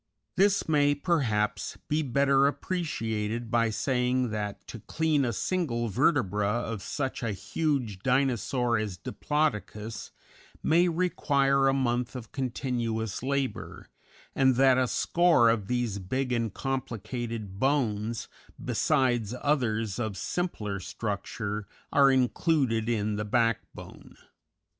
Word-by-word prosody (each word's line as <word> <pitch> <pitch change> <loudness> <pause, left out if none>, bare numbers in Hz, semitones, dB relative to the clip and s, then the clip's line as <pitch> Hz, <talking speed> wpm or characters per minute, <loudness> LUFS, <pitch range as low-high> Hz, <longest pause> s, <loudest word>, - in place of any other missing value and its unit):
This 200 +2 +3
may, 145 -2 +3
perhaps, 110 - 0
be 150 +1 +1
better 140 0 +3
appreciated 115 - -2
by 115 -1 +3
saying 125 +1 0
that 105 -1 -4
to 115 - -7
clean 155 +4 0
a 120 - 0
single 120 - -1
vertebra 105 - +2
of 115 -1 -2
such 135 +7 -3
a 115 -4 -1
huge 120 - -2
Dinosaur 125 -1 +1
as 105 -4 -4
Diplodocus 115 - -2 0.5
may 170 +3 +4
require 140 -6 +2
a 135 - +3
month 125 -2 0
of 120 -4 -8
continuous 120 -5 -2
labor, 135 0 -3 0.4
and 130 -1 +3
that 130 0 +5
a 130 - +2
score 165 -6 +4
of 105 -4 -2
these 120 -4 -1
big 125 +8 -2
and 115 -3 0
complicated 115 -5 -4
bones, 115 -5 0 0.3
besides 120 -4 +1
others 115 -8 0
of 110 -4 -3
simpler 105 - -3
structure, 105 +1 -4 0.3
are 140 -1 +6
included 130 -3 +1
in 105 -2 0
the 105 - -1
backbone. 115 0 -2
120 Hz, 115 wpm, -28 LUFS, 110-140 Hz, 0.5 s, are